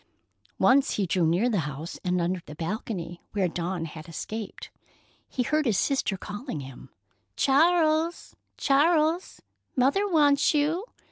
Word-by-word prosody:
Once 275 +1 +4
he 200 - 0
drew 175 -1 +1
near 175 +9 +2
the 215 -6 +1
house 150 +4 -7
and 180 0 0
under 175 +1 -1
the 150 - -9
balcony 175 0 -4
where 195 -3 +1
Dawn 175 0 -3
had 155 +1 -9
escaped. 215 +6 -6 0.6
He 250 - -1
heard 305 +2 +1
his 215 -5 +2
sister 235 -5 0
calling 205 - -6
him, 130 -1 -11 0.5
"Charles, 320 +3 +2 0.2
Charles! 315 +4 +2 0.3
Mother 280 +11 +2
wants 295 -3 +4
you!" 310 +7 +1
225 Hz, 135 wpm, -27 LUFS, -, 0.6 s, Once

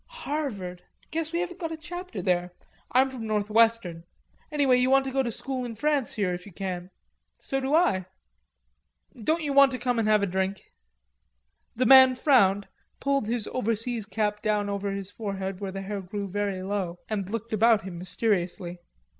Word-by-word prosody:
"Harvard.... 275 - -4 0.3
Guess 320 0 -2
we 340 +1 0
haven't 360 -1 -5
got 330 -2 -3
a 320 - -4
chapter 350 +3 -7
there.... 180 -1 0 0.4
I'm 260 +1 +4
from 235 -4 -6
North 210 -1 -1
Western. 225 -7 +3 0.5
Anyway 280 -4 +3
you 250 +1 +2
want 270 0 +4
to 265 - -3
go 270 +1 +2
to 250 - -1
school 260 +3 -4
in 235 -2 -5
France 290 +1 0
here 195 -5 0
if 180 0 -5
you - - -11
can. 180 -1 -5 0.5
So 270 - -3
do 270 +3 +1
I." 255 - +2 1.1
"Don't 315 +9 0
you 285 -2 -1
want 275 0 +7
to - - -2
come 245 -2 0
and 220 - +1
have 215 -1 +4
a - - +4
drink?" 190 +1 -2 1.1
The 255 +2 +1
man 260 0 +8
frowned, 205 -8 +3 0.3
pulled 275 -5 0
his 230 -1 -1
overseas 230 -2 -1
cap 210 -1 -1
down 210 -2 0
over 200 0 -2
his 195 0 -5
forehead, 195 -3 -4
where 195 -2 -4
the 195 0 -5
hair 200 0 -4
grew 200 +2 -5
very 195 -1 -2
low, 190 -3 -2
and 200 -3 -3
looked 230 +1 -4
about 220 0 +4
him 180 -2 -7
mysteriously. 180 -2 -1
215 Hz, 185 wpm, -27 LUFS, 195-265 Hz, 1.1 s, man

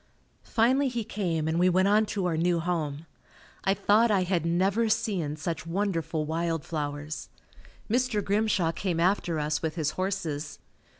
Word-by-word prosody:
Finally 255 +5 +3
he 240 -3 -2
came 170 -7 -2
and 160 +1 0
we 180 +1 +5
went 185 +2 +3
on 210 +1 +4
to 195 -3 -2
our 175 -2 +1
new 170 +1 +2
home. 160 -3 -2 0.6
I 195 0 +2
thought 220 +4 +4
I 195 -3 +3
had 175 -3 0
never 195 +7 +2
seen 200 -9 0
such 165 +2 -4
wonderful 165 -4 -1
wild 165 0 -2
flowers. 145 -1 -4 0.6
Mr. 240 -2 0
Grimshaw 200 -4 +2
came 175 -1 -2
after 175 -2 +1
us 150 0 -1
with 160 -1 -2
his 155 -3 0
horses. 170 -6 -3
175 Hz, 160 wpm, -28 LUFS, 160-205 Hz, 0.6 s, we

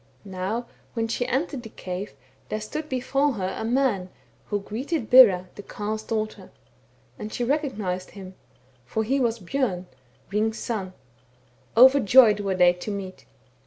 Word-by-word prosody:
Now 195 +5 -3 0.3
when 225 -1 0
she 245 +2 -2
entered 270 +1 -1
the 225 - -10
cave 185 0 -6 0.3
there 215 - -2
stood 300 +9 -6
before 270 +2 0
her 190 -4 -3
a - - -5
man, 230 -6 0 0.4
who 205 - -1
greeted 240 - -4
Bera, 195 -8 +7
the - - -9
Carle's 210 +2 -4
daughter; 215 -1 -4 0.7
and 210 - -6
she 240 - -2
recog 285 0 0
nized 185 -3 -3
him, 190 -2 -10 0.5
for 170 - -2
he 265 +5 0
was 235 -3 +1
Bjom, 195 -3 -2 0.5
Hring's 220 +2 0
son. 195 -5 -4 0.8
Over 260 +3 +8
joyed 220 -2 +6
were 195 -2 -1
they 180 -1 +5
to 180 +4 -7
meet. 195 -2 -6
215 Hz, 155 wpm, -25 LUFS, 195-255 Hz, 0.8 s, Over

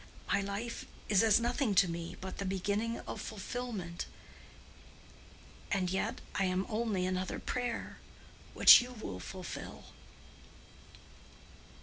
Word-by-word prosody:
My 200 - +3
life 200 +4 -4 0.2
is 200 -2 +5
as 225 -1 +5
nothing 240 -2 0
to 185 - +6
me 170 0 -5
but 190 0 -7
the - - -1
beginning 205 +4 -1
of - - -6
fulfilment. 210 -5 -5 1.6
And 185 -3 +1
yet 190 - -1
I 195 - +1
am 185 +1 0
only 215 -4 0
another 185 0 -2
prayer—which 245 -1 +3
you 250 +1 -7
will 220 - -6
fulfil." 185 -2 -8
200 Hz, 110 wpm, -33 LUFS, 185-230 Hz, 1.6 s, to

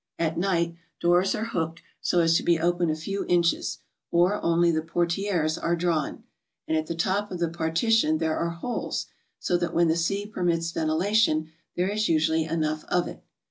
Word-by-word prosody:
At 160 -1 0
night, 170 -2 0 0.3
doors 175 +2 +3
are 215 - -2
hooked 165 -6 -3 0.2
so 175 - +2
as 165 0 +3
to - - +3
be 170 -1 +2
open 175 0 +1
a 155 - +1
few 195 +6 -3
inches, 170 -1 +1 0.3
or 180 +4 +2
only 170 0 +3
the 160 -1 0
portieres 170 0 0
are 170 - +1
drawn, 165 -3 -1 0.4
and 160 - 0
at 155 0 -1
the 170 - -3
top 195 +4 0
of 180 - -5
the 170 -1 0
partition 165 +2 +2
there 160 0 0
are 170 - -1
holes, 170 +9 -3 0.3
so 175 - 0
that 175 -1 -3
when 170 0 +4
the 160 - +3
sea 195 +5 -1
permits 170 -5 -1
ventilation, 160 0 +1 0.2
there 180 +2 0
is 215 +1 0
usually 160 0 +2
enough 155 -1 -1
of 175 -1 0
it. - - -10
170 Hz, 185 wpm, -26 LUFS, 160-180 Hz, 0.4 s, when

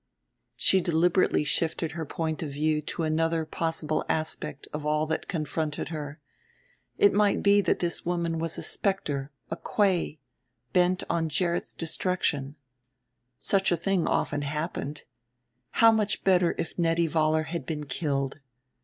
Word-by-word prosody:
She 190 - +4
deliberately 175 0 +2
shifted 165 +1 0
her 160 -2 -5
point 160 0 -3
of 155 - -3
view 150 +2 0
to 165 +3 -4
another 160 +1 +1
possible 155 -1 -1
aspect 150 -2 -2
of 150 0 -4
all 150 +1 +1
that 160 0 -3
confronted 155 -4 -2
her 150 -2 -6 0.8
it 410 -1 +5
might 205 -1 +2
be 205 0 +5
that - - +1
this 170 -1 -1
woman 170 -2 -1
was 165 0 -1
a - - -5
specter, 150 -8 0 0.2
a - - 0
kwei, 185 -7 +1 0.6
bent 180 0 +3
on 165 -1 0
Gerrit's 170 +3 0
destruction. 160 -4 -1 0.8
Such 195 -2 +2
a 175 - +3
thing 185 +1 0
often 145 -1 0
happened. 150 0 -4 0.7
How 225 0 +6
much 215 -1 0
better 180 -3 +3
if 170 +1 -4
Nettie 165 0 +2
Vollar 155 0 +2
had 165 -5 -5
been 150 -2 -3
killed! 140 -1 -2
165 Hz, 145 wpm, -27 LUFS, 150-175 Hz, 0.8 s, How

